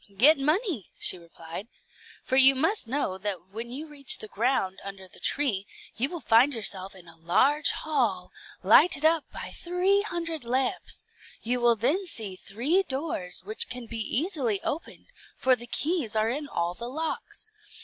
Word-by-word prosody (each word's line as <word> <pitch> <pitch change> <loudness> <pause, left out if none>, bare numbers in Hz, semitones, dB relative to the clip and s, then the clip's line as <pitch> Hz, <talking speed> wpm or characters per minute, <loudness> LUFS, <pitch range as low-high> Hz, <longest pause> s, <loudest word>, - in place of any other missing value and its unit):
"Get 285 +7 +6
money," 305 - 0
she 185 - +2
replied; 170 +3 -9 0.6
"for 260 - -1
you 270 0 +9
must 320 - +1
know 230 -7 -2
that 190 -2 -4
when 230 +3 -5
you 275 +6 -5
reach 290 -3 +2
the 215 - -8
ground 210 -3 -1
under 195 -1 -9
the - - -16
tree, 215 -9 0 0.3
you 260 +4 0
will 345 -1 -6
find 245 +4 +4
yourself 195 -3 -1
in 180 -2 -14
a 165 - -14
large 275 - +2
hall, 230 -12 -1 0.3
lighted 280 - +5
up 320 -1 +3
by - - -7
three 365 +3 +1
hundred 335 - -4
lamps; 255 +2 -2 0.4
you 245 +2 0
will 240 -1 +4
then 310 - 0
see 215 - -4
three 245 - 0
doors, 265 - -3
which 215 +3 -3
can 250 -1 -6
be 230 0 -5
easily 250 - 0
opened, 320 - -5 0.3
for 260 0 +3
the 240 0 -10
keys 295 - 0
are 215 +1 +2
in 290 +3 -4
all 170 0 -2
the 235 +6 -6
locks. 320 - -5
250 Hz, 170 wpm, -27 LUFS, 205-305 Hz, 0.6 s, you